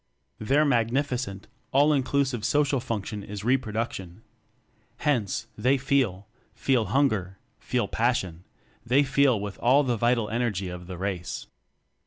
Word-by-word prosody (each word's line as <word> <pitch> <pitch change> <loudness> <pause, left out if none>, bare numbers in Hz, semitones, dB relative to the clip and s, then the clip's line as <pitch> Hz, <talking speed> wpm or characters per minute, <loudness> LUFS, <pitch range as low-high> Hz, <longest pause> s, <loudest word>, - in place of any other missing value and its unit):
Their 140 +7 +3
magnifi 125 +1 +1
cent 100 -4 -6 0.3
all 145 +3 +4
inclusive 135 -3 0
social 145 +1 +2
function 110 -4 -4
is 100 0 -7
re 125 +4 +4
production. 110 -5 -4 0.7
Hence, 120 -10 0
they 135 +2 +2
feel 130 - 0 0.3
feel 125 -5 +1
hunger, 105 -5 +1 0.2
feel - - -1
passion 85 -2 -1 0.4
they 130 +5 +3
feel 135 -4 +3
with 100 -1 -6
all 135 +4 +4
the 125 -3 0
vital 120 0 +2
energy 110 -5 -1
of 90 0 -8
the 90 -1 -6
race. 95 -2 -4
120 Hz, 135 wpm, -26 LUFS, 100-135 Hz, 0.7 s, all